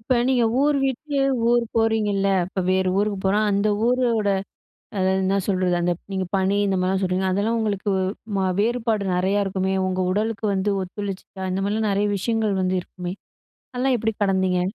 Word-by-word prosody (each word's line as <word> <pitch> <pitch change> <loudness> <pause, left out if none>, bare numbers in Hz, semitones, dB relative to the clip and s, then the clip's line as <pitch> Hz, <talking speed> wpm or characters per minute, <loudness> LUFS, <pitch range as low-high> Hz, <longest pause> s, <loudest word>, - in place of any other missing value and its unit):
இப்ப 245 +3 0
நீங்க 250 -3 +3 0.2
ஊர் 290 0 +3
விட்டு, 280 +2 -2 0.3
ஊர் 240 -1 +3
போறீங்கள்ல, 210 -3 +2 0.2
இப்ப 190 +1 -4
வேறு 190 0 +2
ஊருக்கு 205 -1 0
போனா, 200 +2 +3
அந்த 200 +2 +2 0.2
ஊரோட 235 -4 +2 0.7
அதாவது 190 0 +2
என்ன 195 +1 +2
சொல்றது, 185 -2 +1
அந்த 175 0 +1 0.2
நீங்க 190 -1 -1
பனி 195 +1 +1
இந்த 195 -1 +1
மாரிலாம் 190 +1 +1
சொல்றீங்க 185 0 0
அதெல்லாம் 205 +5 0
உங்களுக்கு 205 -2 -1 0.5
மா 190 - +1 0.2
வேறுபாடு 225 -2 0
நெறையா 190 +3 +1
இருக்குமே, 190 0 -1
உங்க 185 0 -1
உடலுக்கு 215 +1 -2
வந்து 195 +2 0
ஒத்துழைச்சுச்சா? 195 0 -6
இந்த 190 - -1
மாரிலாம் 215 +2 0
நெறைய 200 +1 +1
விஷயங்கள் 215 -1 0
வந்து 185 0 +1
இருக்குமே? 180 0 -7 0.6
அதெல்லாம் 255 +1 +1
எப்படி 225 +1 0
கடந்தீங்க? 190 -2 +1
200 Hz, 165 wpm, -23 LUFS, 190-225 Hz, 0.7 s, நீங்க